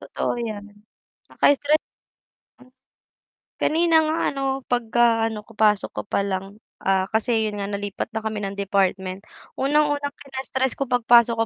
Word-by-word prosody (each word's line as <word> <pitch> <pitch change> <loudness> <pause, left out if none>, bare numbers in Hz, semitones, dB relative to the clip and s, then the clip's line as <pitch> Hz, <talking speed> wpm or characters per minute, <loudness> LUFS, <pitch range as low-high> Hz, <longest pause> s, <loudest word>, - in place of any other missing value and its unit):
Totoo - - -3
yan, 210 -3 -5 0.6
nakaka-stre 285 +1 +3 0.9
M - - -22 0.9
Kanina 330 +1 +2
nga 315 +1 0
ano 275 -1 -4 0.3
pagkaano 230 -2 +2
ko - - -15
pasok 210 -2 +2
ko - - -2
pa - - 0
lang, 195 +1 -4 0.2
ah, 190 -1 +2
kasi 220 0 +1
'yun 205 -1 -5
nga 200 - -3
nalipat 200 0 -3
na 220 - -2
kami 220 -1 -3
ng 195 0 -4
department. 190 -1 0 0.4
Unang-unang 290 0 +1
kina-stress 265 -1 -3
ko 275 - -1
pagpasok 240 -1 +4
225 Hz, 135 wpm, -23 LUFS, 200-265 Hz, 0.9 s, pagpasok